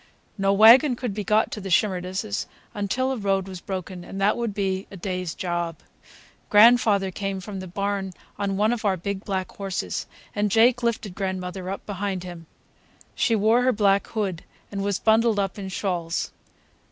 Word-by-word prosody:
No 195 -1 +1
wagon 235 +7 +7
could 240 -3 -4
be 210 +1 -3
got 215 +1 +2
to 210 - -5
the 195 - -6
Shimerdas' 190 +2 0 0.3
until 230 +6 -1
a 265 - -2
road 195 -2 0
was 185 -2 -8
broken, 185 -1 -5
and 195 - -7
that 200 +2 +3
would 235 -2 -2
be 195 -1 -2
a 195 - -10
day's 180 -2 -3
job. 175 -2 -2 0.7
Grandfather 210 -3 +5
came 195 0 -3
from 195 +1 -7
the 185 - -7
barn 200 +1 -2 0.3
on 195 -1 -1
one 215 +3 +3
of 235 - -4
our 195 -3 +2
big 195 +3 -4
black 190 -2 -3
horses, 195 -2 -4 0.3
and 205 0 0
Jake 235 +4 +4
lifted 230 -5 -1
grandmother 185 -1 -4
up 195 - -5
behind 195 -2 -3
him. 175 -3 -9 0.7
She 230 - +2
wore 220 +3 +3
her 255 +1 +3
black 200 -3 +2
hood 195 -6 -3 0.3
and 200 -1 -3
was 200 -1 0
bundled 225 0 +3
up 195 0 -1
in 190 -1 -5
shawls. 175 -3 -2
200 Hz, 175 wpm, -24 LUFS, 185-215 Hz, 0.7 s, wagon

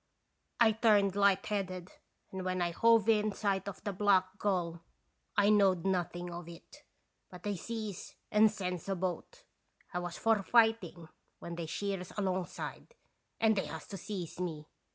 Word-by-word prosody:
I 230 -2 +6
turned 210 -3 +3
light 200 -1 +3
headed, 185 -4 -3 0.4
and 190 -1 -5
when 185 0 -1
I 175 -1 0
hove 230 +3 +4
in 215 -2 +3
sight 195 -2 -1
of 200 - -7
the 205 - -2
Black 190 0 +2
Gull 175 -4 -1 0.6
Ijknowed 200 -4 +4
nothing 175 -2 -1
of 170 -1 -7
it; 170 -1 -13 0.5
but 180 -1 -12
they 205 -1 -1
sees 215 +1 -6 0.2
and 215 +1 +6
sends 185 -4 -4
a 195 - +1
boat. 190 - -4 0.5
1 180 - -2
was 175 -1 -5
for 225 -2 +2
fighting 225 -6 +2 0.3
when 170 - -7
they 170 -1 -5
sheers 195 +1 -3
alongside, 190 - -3 0.4
and 220 -1 +4
they 195 - -1
has 160 -1 -7
to 195 - -5
seize 185 -5 -6
me. 160 -4 -4
195 Hz, 155 wpm, -32 LUFS, 180-210 Hz, 0.6 s, I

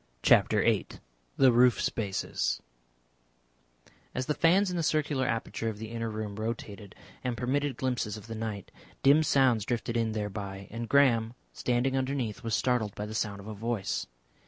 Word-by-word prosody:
CHAPTER - - +5
VIII - - +2 0.5
THE 130 -2 +6
ROOF 120 +1 +5
SPACES 100 -4 -1 1.6
As 130 - -1
the 150 - 0
fans 180 +5 +3
in - - -3
the 170 - 0
circular 150 -4 +1
aperture 115 0 -2
of 110 - -6
the 110 +1 -7
inner 115 -1 -3
room 105 -2 -5
rotated 110 -2 -5 0.3
and 125 -2 -2
permitted 130 +2 -1
glimpses 125 -5 -1
of 105 - -11
the 115 - -6
night, 110 -3 -5 0.3
dim 140 +3 +6
sounds 130 -7 +3
drifted 120 +1 -2
in 115 -1 +1
thereby. 100 -2 -5
And 115 +1 -5
Graham, 120 -4 +4 0.2
standing 125 +2 0
underneath, 130 -5 -2
was 115 -1 0
startled 120 -5 0
by 105 - -4
the 105 - -7
sound 105 -2 -2
of 100 - -12
a 110 - -5
voice. 110 -1 -2
115 Hz, 165 wpm, -29 LUFS, 110-130 Hz, 1.6 s, THE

